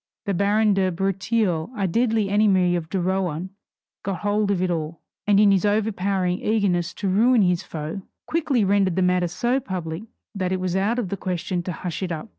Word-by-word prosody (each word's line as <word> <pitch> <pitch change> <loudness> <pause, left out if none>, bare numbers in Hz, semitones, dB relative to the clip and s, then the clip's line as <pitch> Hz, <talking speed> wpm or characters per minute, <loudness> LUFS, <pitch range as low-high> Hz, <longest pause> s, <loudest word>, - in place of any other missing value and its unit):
The 200 - 0
baron 205 +3 +3
de 190 -1 +1
Breteuil, 195 -1 0
a 195 -2 +1
deadly 225 +2 +1
enemy 195 -3 +3
of 165 -2 -4
de 195 - -1
Rohan, 185 -1 -1 0.5
got 195 -2 -4
hold 205 0 +1
of 200 -3 +1
it 185 0 0
all, 160 -1 -3 0.3
and 205 -1 +5
in 205 -1 +6
his 195 -2 +2
overpowering 200 -3 0
eagerness 185 -6 +1
to 200 - -3
ruin 220 +4 +4
his 180 -2 +2
foe, 155 +4 -6 0.2
quickly 285 -9 +1
rendered 195 -2 +2
the 190 - +2
matter 180 -1 +2
so 240 +10 0
public 175 -6 -5 0.3
that 185 -2 -2
it 185 - 0
was 185 -1 -2
out 205 +5 +1
of 225 -7 -2
the 200 - -3
question 180 -1 -2
to 180 - -4
hush 175 +1 -5
it 185 -2 -2
up. 155 -2 -5
190 Hz, 200 wpm, -23 LUFS, 180-205 Hz, 0.5 s, in